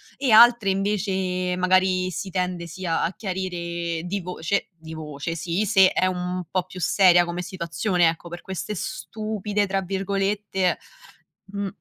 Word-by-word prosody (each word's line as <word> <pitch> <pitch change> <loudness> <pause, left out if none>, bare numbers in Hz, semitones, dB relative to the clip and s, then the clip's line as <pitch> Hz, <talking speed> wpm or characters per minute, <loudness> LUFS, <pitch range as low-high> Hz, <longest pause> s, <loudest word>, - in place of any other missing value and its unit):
e 265 -5 0
altre 235 -2 +7
invece, 190 -2 0
magari 185 0 +2
si 180 +3 -5
tende 180 -2 -2
sì 185 +3 -8
a 165 -1 0
a 165 - 0
chiarire 170 -4 -3
di 200 +2 -2
voce 180 +2 -2
di 160 0 -9
voce 155 +1 -5
sì 170 +5 -1
se 190 -2 +5
è 185 - +1
un 180 0 -2
po' 185 -1 0
più 185 +1 -11
seria 175 0 +5
come 175 +1 -4
situazione 175 0 0
ecco, 165 +1 -3
per 175 +1 -7
queste 190 +2 -5
"stupide", 215 -2 -3
tra 195 0 0
virgolette, 195 0 -1 0.8
mhmm 200 -1 -3
185 Hz, 150 wpm, -24 LUFS, 175-195 Hz, 0.8 s, altre